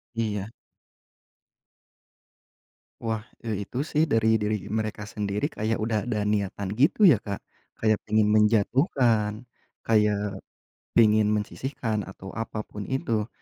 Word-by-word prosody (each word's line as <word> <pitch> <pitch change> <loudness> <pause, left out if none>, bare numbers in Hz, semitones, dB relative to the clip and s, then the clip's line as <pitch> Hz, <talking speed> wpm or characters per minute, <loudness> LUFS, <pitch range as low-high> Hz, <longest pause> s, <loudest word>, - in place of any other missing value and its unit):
Iya. 105 -3 -2 2.5
Wah, 110 -1 -2 0.2
eee, 105 -3 -2
itu 135 +4 -2
sih 155 0 +1
dari 110 -1 +3
diri 105 -1 -1
mereka 110 -1 -2
sendiri 105 +2 -2
kayak 110 +1 -1
udah 110 -1 0
ada 105 -3 0
niatan 100 -1 -1
gitu 145 - +4
ya, 135 - +6
Kak. 100 -2 -4 0.4
Kayak 110 -1 +2
pingin 110 0 +4
menjatuhkan, 110 - +2 0.4
kayak 105 -2 +1 0.6
pingin 110 -2 +5
mensisihkan, 110 +1 -2
atau 95 0 -9
apa 110 -1 -4
pun 105 -1 -8
itu 115 -5 -1
110 Hz, 115 wpm, -26 LUFS, 105-115 Hz, 2.5 s, ya